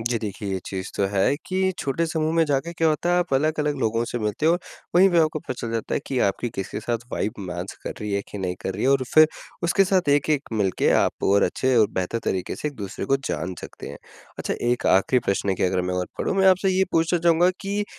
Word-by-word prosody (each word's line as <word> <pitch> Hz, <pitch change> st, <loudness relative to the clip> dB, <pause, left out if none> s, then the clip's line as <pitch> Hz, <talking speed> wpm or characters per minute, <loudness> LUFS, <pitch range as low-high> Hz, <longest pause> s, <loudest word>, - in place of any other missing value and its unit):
जी, 115 Hz, 0 st, -1 dB
देखिए, 100 Hz, -2 st, -5 dB
ये 95 Hz, -, -1 dB
चीज़ 95 Hz, -1 st, -5 dB
तो 100 Hz, -, +2 dB
है 100 Hz, +7 st, +2 dB
कि 190 Hz, 0 st, 0 dB
छोटे 140 Hz, +5 st, -1 dB
समूह 160 Hz, -1 st, -1 dB
में 165 Hz, -, +4 dB
जाके 145 Hz, +4 st, -1 dB
क्या 165 Hz, -1 st, +1 dB
होता 155 Hz, +3 st, 0 dB
है, 180 Hz, -, +4 dB
आप 175 Hz, -5 st, -1 dB
अलग-अलग 150 Hz, +1 st, +1 dB
लोगों 115 Hz, 0 st, 0 dB
से 120 Hz, -, -4 dB
मिलते 105 Hz, +8 st, -1 dB
हो 165 Hz, -, +5 dB
और 175 Hz, -, +1 dB, 0.4 s
वहीं 185 Hz, +2 st, +7 dB
पे 170 Hz, -, +3 dB
आपको 155 Hz, -1 st, +2 dB
पता 130 Hz, -, -5 dB
चल 115 Hz, -1 st, -4 dB
जाता 115 Hz, -, -2 dB
है -, -, 0 dB
कि 130 Hz, -, -1 dB
आपकी 120 Hz, +4 st, -3 dB
किसके 95 Hz, +2 st, -4 dB
साथ 120 Hz, +1 st, -1 dB
वाइब 105 Hz, -, -1 dB
मैच 90 Hz, -1 st, -5 dB
कर -, -, -4 dB
रही 105 Hz, -1 st, -3 dB
है, 100 Hz, -, +1 dB
कि 105 Hz, -, -6 dB
नहीं 90 Hz, -2 st, -2 dB
कर 95 Hz, -, -2 dB
रही 105 Hz, -, -4 dB
है, -, -, +3 dB
और 135 Hz, -1 st, +3 dB
फिर 155 Hz, 0 st, +8 dB, 0.4 s
उसके 185 Hz, +3 st, +3 dB
साथ 185 Hz, -5 st, +1 dB
एक-एक 145 Hz, 0 st, +2 dB
मिलके 100 Hz, -4 st, +1 dB
आप -, -, -2 dB
और 100 Hz, +1 st, +4 dB
अच्छे 130 Hz, -1 st, +1 dB
और 110 Hz, -3 st, +6 dB
बेहतर 95 Hz, +5 st, -1 dB
तरीके 95 Hz, -1 st, -2 dB
से 150 Hz, -, -2 dB
एक 145 Hz, -, -10 dB
दूसरे 100 Hz, -1 st, -5 dB
को 135 Hz, -, +3 dB
जान 85 Hz, +5 st, -3 dB
सकते -, -, -9 dB
हैं। -, -, -9 dB, 0.4 s
अच्छा -, -, -2 dB, 0.2 s
एक 125 Hz, -, 0 dB
आखिरी 100 Hz, +7 st, +4 dB
प्रश्न 100 Hz, 0 st, +1 dB
की -, -, -3 dB
अगर 90 Hz, 0 st, +1 dB
मैं 90 Hz, 0 st, -2 dB
ओर 90 Hz, 0 st, -1 dB
बढ़ूँ, -, -, 0 dB
मैं 190 Hz, 0 st, +4 dB
आपसे 190 Hz, +1 st, +3 dB
ये 190 Hz, -, +4 dB
पूछना 165 Hz, +2 st, +2 dB
चाहूँगा 170 Hz, +1 st, +4 dB
कि 205 Hz, +1 st, -2 dB
130 Hz, 255 wpm, -24 LUFS, 100-165 Hz, 0.4 s, फिर